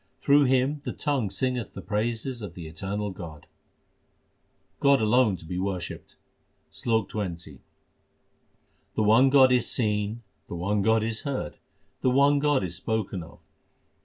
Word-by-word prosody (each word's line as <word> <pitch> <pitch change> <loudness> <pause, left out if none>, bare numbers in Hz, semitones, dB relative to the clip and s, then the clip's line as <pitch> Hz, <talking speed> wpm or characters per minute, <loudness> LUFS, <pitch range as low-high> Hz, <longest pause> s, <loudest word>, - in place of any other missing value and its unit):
Through 145 0 +4
him 130 +3 +1
the 125 - -4
tongue 140 -8 -1
singeth 125 +2 -2
the - - -6
praises 115 +3 -2
of 95 -5 -7
the 85 - -8
Eternal 100 +6 -4
God. 80 -5 -10 1.3
God 140 -1 +4
alone 110 -2 +3
to 80 - -14
be 90 +3 -4
worshipped: 95 -2 -4 0.6
SLOK 110 -4 0
XX 85 -9 -5 1.4
The 110 - +1
one 115 +6 +5
God 130 -2 +6
is 125 -2 +2
seen, 105 0 0 0.2
the - - -6
one 100 +4 0
God 110 +1 +3
is 110 -1 -2
heard, 135 - -4 0.4
the 130 - +3
one 140 +2 +4
God 145 -6 +2
is 90 -2 -2
spoken 105 -4 -2
of. 85 0 -13
110 Hz, 145 wpm, -26 LUFS, 95-130 Hz, 1.4 s, God